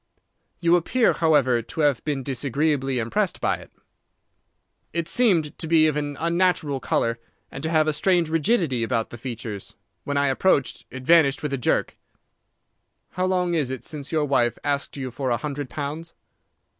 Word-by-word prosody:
"You 170 0 +4
appear, 230 +8 +2
however, 140 -7 +3
to 140 +7 -5
have 145 -5 +2
been 145 -3 -2
disagreeably 135 +1 -1
impressed 115 -1 -1
by - - 0
it." - - -15 1.2
"It 170 0 -2
seemed 170 -10 +2
to 160 - -4
be 160 -1 +5
of 155 -2 +2
an 145 -1 -3
unnatural 170 -4 +1
colour, 115 -2 0 0.3
and 135 - -7
to 160 - -2
have 155 -1 +3
a 155 - +2
strange 175 +1 +2
rigidity 165 - +1
about 115 -1 -1
the 120 - -9
features. 115 -5 -7 0.3
When 145 0 -2
I 140 - +3
approached, 135 -1 +1
it 130 0 -8
vanished 145 -2 +4
with 150 -2 -2
a - - +1
jerk." 120 - 0 1.1
"How 185 - -1
long 180 -2 +1
is 150 -6 0
it 130 -2 -5
since 150 -4 -5
your 155 -2 +1
wife 120 -4 +1
asked 145 0 -1
you 130 -2 -4
for 130 +1 -3
a 120 - +1
hundred 145 +1 -5
pounds?" 155 +4 -5
145 Hz, 170 wpm, -24 LUFS, 130-165 Hz, 1.2 s, be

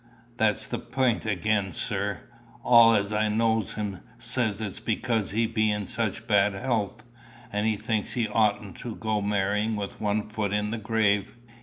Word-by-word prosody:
"That's 110 -1 +2
the - - -4
pint 120 -2 0
again, 100 -1 0
sir. 100 -3 -2 0.4
All 115 -2 +7
as 100 0 0
knows 110 +1 +1
him 105 -3 -4 0.2
says 120 -3 0
it's 105 -3 -4
because 110 -2 -1
he 115 +3 +1
be 110 -1 +1
in 105 -1 -1
such 110 +2 -3
bad 105 -3 +3
health, 110 -1 -2 0.5
and 105 +1 +1
he 110 - +2
thinks 110 0 -2
he 115 -3 0
oughtn't 105 -3 0
to 115 -3 -6
go 110 -1 -1
marrying 105 +2 0
with 100 -1 -5
one 105 0 +1
foot 105 -2 -2
in 105 0 0
the 115 - -3
grave. 105 -2 +1
110 Hz, 165 wpm, -27 LUFS, 105-110 Hz, 0.5 s, All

